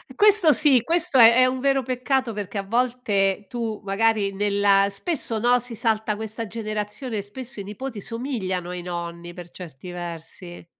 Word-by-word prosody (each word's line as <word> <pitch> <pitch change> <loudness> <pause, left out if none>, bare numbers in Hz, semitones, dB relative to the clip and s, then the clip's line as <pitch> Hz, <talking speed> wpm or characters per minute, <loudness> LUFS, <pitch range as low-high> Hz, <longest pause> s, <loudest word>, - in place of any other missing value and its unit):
Questo 415 -6 +6
sì, 280 -5 +5
questo 335 +1 +2
è 230 - +10
è 255 +1 +5
un 255 0 -1
vero 270 0 +1
peccato, 255 0 -1
perché 205 0 -6
a 195 - -2
volte 210 -3 0
tu 225 -1 -4
magari 205 0 +1
nella 200 0 +2
spesso, 230 - -2
no, 245 +2 +3
si 245 -1 -4
salta 220 -1 0
questa 220 +1 -6
generazione 215 +2 -4
e - - -1
spesso 235 +4 -8
i - - -5
nipoti 210 +3 -7
somigliano 210 -7 -4
ai 180 0 -5
nonni 175 0 -6
per 175 -1 -11
certi 180 -1 -10
versi. 175 0 -8
215 Hz, 165 wpm, -23 LUFS, 195-250 Hz, -, è